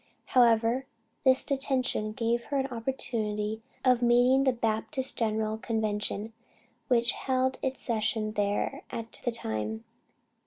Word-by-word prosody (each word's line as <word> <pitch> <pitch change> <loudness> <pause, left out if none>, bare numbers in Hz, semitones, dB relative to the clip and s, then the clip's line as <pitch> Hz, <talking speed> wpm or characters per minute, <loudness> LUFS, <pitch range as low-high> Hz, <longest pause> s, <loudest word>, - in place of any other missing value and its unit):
However, 240 +1 +4 0.4
this 260 -1 +5
detention 260 -6 0
gave 235 0 0
her 285 - -2
an 265 - +1
opportunity 220 -3 -2 0.2
of 250 -2 +4
meeting 245 +3 +4
the 260 - +5
Baptist 235 +3 -1
General 220 -1 -1
Convention 215 -1 -2 0.5
which 235 -1 +3
held 260 0 0
its 265 0 -2
session 220 -1 0
there 205 -1 -1
at 230 0 -7
that 240 - 0
time. 110 - -3
230 Hz, 120 wpm, -29 LUFS, 215-255 Hz, 0.5 s, this